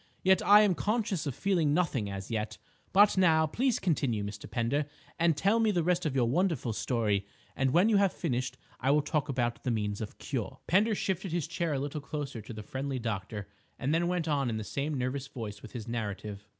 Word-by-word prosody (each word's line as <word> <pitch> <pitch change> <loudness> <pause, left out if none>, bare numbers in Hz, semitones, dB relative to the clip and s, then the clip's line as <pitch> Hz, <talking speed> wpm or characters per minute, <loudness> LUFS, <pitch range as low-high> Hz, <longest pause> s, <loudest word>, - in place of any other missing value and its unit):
Yet 190 -1 +5
I 205 +1 +7
am 200 -3 +4
conscious 205 -5 -1
of 135 - -3
feeling 170 -7 +2
nothing 135 - 0
as 95 +2 -6
yet. 110 -1 -2 0.3
But 205 0 +5
now, 160 -4 +5
please 245 - +1
continue, 140 - 0
Mr. 100 0 -7
Pender, 130 +5 0 0.3
and 165 -2 +3
tell 205 +4 +3
me 225 -1 +3
the 175 -5 +1
rest 180 -1 +1
of 140 - -3
your 125 -3 +3
wonderful 145 - +1
story; 105 -4 0 0.3
and 135 0 +1
when 175 +10 +4
you 220 -2 +4
have 200 -2 +4
finished, 125 0 -2 0.2
I 135 - 0
will 145 +1 +4
talk 145 -1 -1
about 120 -3 -1
the 130 - -1
means 105 -3 -1
of 110 - -6
cure." 115 -9 -4
Pender 210 +5 +3
shifted 190 -2 -2
his 170 -2 0
chair 170 -1 -2
a 135 - 0
little 145 +2 -4
closer 145 -6 -5
to 110 - -10
the 110 -2 -7
friendly 135 +3 -3
doctor 105 -3 -4 0.3
and 140 +3 -1
then 170 +1 +2
went 175 -2 -1
on 140 -4 +1
in 110 - -2
the 110 - -3
same 140 +7 -2
nervous 130 +2 -2
voice 105 -6 -7
with - - -11
his 120 -3 -6
narrative. 105 -3 -4
140 Hz, 215 wpm, -30 LUFS, 115-175 Hz, 0.3 s, I